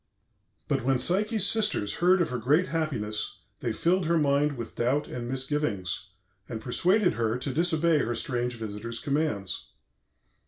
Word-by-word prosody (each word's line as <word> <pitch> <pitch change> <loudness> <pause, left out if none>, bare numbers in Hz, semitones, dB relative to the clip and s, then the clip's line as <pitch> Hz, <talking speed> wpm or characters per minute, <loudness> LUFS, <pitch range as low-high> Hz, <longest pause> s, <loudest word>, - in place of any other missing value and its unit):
"But - - 0
when 135 +1 +2
Psyche's 200 - +3
sisters 210 - +3
heard 180 +1 +4
of - - -4
her 125 - -2
great 150 - +2
happiness 125 -11 -2 0.2
they 120 - -2
filled 170 +8 +1
her 170 0 +3
mind 145 -1 +2
with 115 -1 -7
doubt 130 +5 0
and 120 -1 -5
misgivings, 130 -8 -2 0.4
and 115 - -4
persuaded 180 - +2
her 115 0 0
to 130 +1 -4
disobey 165 0 +2
her 120 -2 -1
strange 125 -2 -2
visitor's 115 +1 -5
commands. 140 -10 -2
140 Hz, 150 wpm, -27 LUFS, 115-165 Hz, 0.4 s, heard